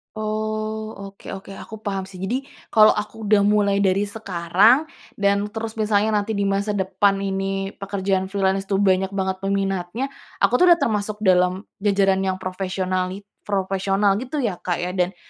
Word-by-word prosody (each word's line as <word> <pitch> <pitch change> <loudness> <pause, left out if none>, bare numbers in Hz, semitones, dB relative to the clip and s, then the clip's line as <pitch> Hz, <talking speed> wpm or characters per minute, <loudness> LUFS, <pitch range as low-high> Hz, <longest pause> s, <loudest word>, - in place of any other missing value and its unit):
Oh, 215 0 -3 0.2
oke 195 0 -11
oke, 195 0 -8
aku 220 +2 -9
paham 195 -2 -3
sih. 190 -1 -11
Jadi 240 +9 -2 0.2
kalau 215 -1 +6
aku 210 +1 -4
udah 205 -1 +4
mulai 205 -1 +3
dari 195 0 +2
sekarang 205 - +3 0.3
dan 200 0 +1
terus 225 +1 -6
misalnya 215 0 +2
nanti 215 +2 -3
di 200 - 0
masa 200 +1 0
depan 195 +1 +2
ini 195 0 -2
pekerjaan 195 -1 -1
freelance 195 0 0
itu 195 - 0
banyak 190 -1 +3
banget 190 -1 -1
peminatnya, 195 +5 -2 0.3
aku - - +5
tuh 360 - +6
udah 345 -1 +6
termasuk 215 -4 -1
dalam 180 0 +3 0.2
jajaran 195 -1 +2
yang 190 - 0
profesionali 185 0 -2 0.2
profesional 195 0 +1
gitu 260 +4 -5
ya, 200 -7 -2
Kak, 175 -2 -2
ya, 180 - -2
dan 180 0 0
200 Hz, 160 wpm, -22 LUFS, 190-210 Hz, 0.3 s, kalau